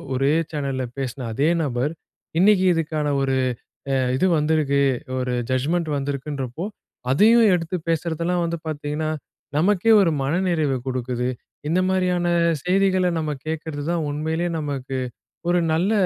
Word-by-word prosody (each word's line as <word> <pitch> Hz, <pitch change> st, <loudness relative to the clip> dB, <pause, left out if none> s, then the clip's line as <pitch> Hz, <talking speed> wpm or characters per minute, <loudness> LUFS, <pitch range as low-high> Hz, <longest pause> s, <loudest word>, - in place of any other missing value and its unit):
ஒரே 135 Hz, +3 st, +2 dB, 0.2 s
சேனல்ல 135 Hz, -3 st, -2 dB
பேசுன 130 Hz, -1 st, -4 dB
அதே 145 Hz, +7 st, +2 dB
நபர், 130 Hz, +1 st, -1 dB, 0.5 s
இன்னைக்கு 190 Hz, 0 st, +5 dB
இதுக்கான 155 Hz, -2 st, -1 dB
ஒரு 135 Hz, -1 st, +1 dB, 0.6 s
அ -, -, +3 dB, 0.2 s
இது 165 Hz, -, +2 dB
வந்திருக்கு. 150 Hz, -2 st, +2 dB, 0.4 s
ஒரு 125 Hz, -1 st, -1 dB, 0.2 s
ஜட்ஜ்மெண்ட் 155 Hz, +6 st, 0 dB
வந்திருக்குன்றப்போ 140 Hz, +1 st, -3 dB, 0.5 s
அதையும் 220 Hz, -, +6 dB
எடுத்து 170 Hz, +1 st, -1 dB
பேசுறதெல்லாம் 170 Hz, +2 st, 0 dB
வந்து 170 Hz, 0 st, -1 dB
பார்த்தீங்கன்னா, 150 Hz, +1 st, -2 dB, 0.5 s
நமக்கே 200 Hz, +5 st, +3 dB
ஒரு 175 Hz, -, +3 dB
மனநிறைவ 160 Hz, 0 st, +1 dB, 0.2 s
கொடுக்குது. 125 Hz, -1 st, -2 dB, 0.4 s
இந்த 175 Hz, +3 st, +2 dB
மாதிரியான 180 Hz, -2 st, +1 dB, 0.4 s
செய்திகள 185 Hz, 0 st, +3 dB
நம்ம 155 Hz, -1 st, -2 dB, 0.2 s
கேட்கறது 160 Hz, -2 st, -4 dB
தான் 170 Hz, -2 st, 0 dB
உண்மையிலேயே 160 Hz, +4 st, -1 dB
நமக்கு 135 Hz, -3 st, -3 dB, 0.5 s
ஒரு 175 Hz, 0 st, +3 dB
நல்ல, 180 Hz, +7 st, +2 dB
155 Hz, 125 wpm, -23 LUFS, 140-175 Hz, 0.6 s, அதையும்